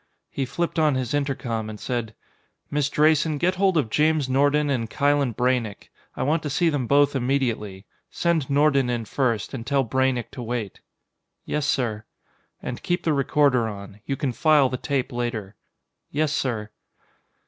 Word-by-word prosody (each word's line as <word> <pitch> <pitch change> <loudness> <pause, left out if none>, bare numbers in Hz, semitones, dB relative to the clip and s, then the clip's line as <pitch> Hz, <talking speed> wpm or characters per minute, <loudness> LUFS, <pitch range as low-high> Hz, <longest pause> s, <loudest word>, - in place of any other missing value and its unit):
He 135 - -2
flipped 170 +5 -2
on 155 -3 +3
his 130 -1 -2
intercom 125 -6 -2
and 105 -1 -8
said: 120 -4 -3 0.6
"Miss 145 -1 +1
Drayson, 155 0 +3
get 175 +5 +2
hold 190 -1 +2
of 115 -8 0
James 155 -2 +2
Nordon 145 +3 +2
and 115 -4 -1
Kylen 140 -4 +1
Braynek. 125 -4 -1 0.3
I - - -1
want 155 +4 +1
to 150 - -4
see 170 +4 +2
them 140 -6 -1
both 145 +1 +4
immediately. 120 -7 -1 0.2
Send 170 -5 0
Nordon 140 -2 +3
in 120 -2 -2
first, 115 -3 -1
and 125 -4 -4
tell 135 +2 +1
Braynek 130 0 0
to 130 - -7
wait." 115 -4 -4 0.6
"Yes, 150 -1 -1
sir." 115 -7 0 0.6
"And 125 - -5
keep 175 0 -1
the 160 - +2
recorder 140 -3 +2
on. 100 -1 -8
You 135 - 0
can 140 -4 -1
file 150 -2 +4
the 130 - -3
tape 135 0 -2
later." 120 -5 -3 0.5
"Yes, 150 0 0
sir." 115 -8 -2
135 Hz, 165 wpm, -24 LUFS, 120-150 Hz, 0.6 s, both